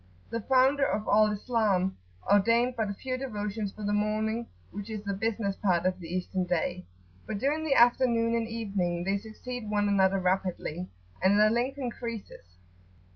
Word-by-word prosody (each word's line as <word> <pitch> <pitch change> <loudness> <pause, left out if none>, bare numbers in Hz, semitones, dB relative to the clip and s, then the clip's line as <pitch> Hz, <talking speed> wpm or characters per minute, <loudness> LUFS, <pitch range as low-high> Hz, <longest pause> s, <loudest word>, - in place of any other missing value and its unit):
The 230 - -2
founder 265 +4 +3
of 215 -5 0
Al 215 0 +5
Islam 205 -4 +1 0.3
ordained 230 +5 +4
but 220 -3 -1
few 255 -1 -3
devotions 210 -5 -3
for 215 - -10
the 205 0 0
morning, 215 +2 0 0.2
which 205 +2 -7
is 215 -2 -5
the 200 -1 -2
business 205 -1 -1
part 180 -4 +1
of 185 0 0
the 170 - -8
Eastern 185 +1 -2
day; 160 - -2 0.4
but 215 - -3
during 290 +8 0
the 295 -3 +1
afternoon 235 -1 +4
and 230 -1 0
evening 195 -6 -2
they 195 +2 0
succeed 220 +2 -7
one 205 -1 +1
another 195 -1 +3
rapidly, 185 -2 -1 0.3
and 195 +2 +4
their 215 0 +5
length 250 +4 0
increases. 230 - -6
210 Hz, 165 wpm, -29 LUFS, 195-235 Hz, 0.4 s, Al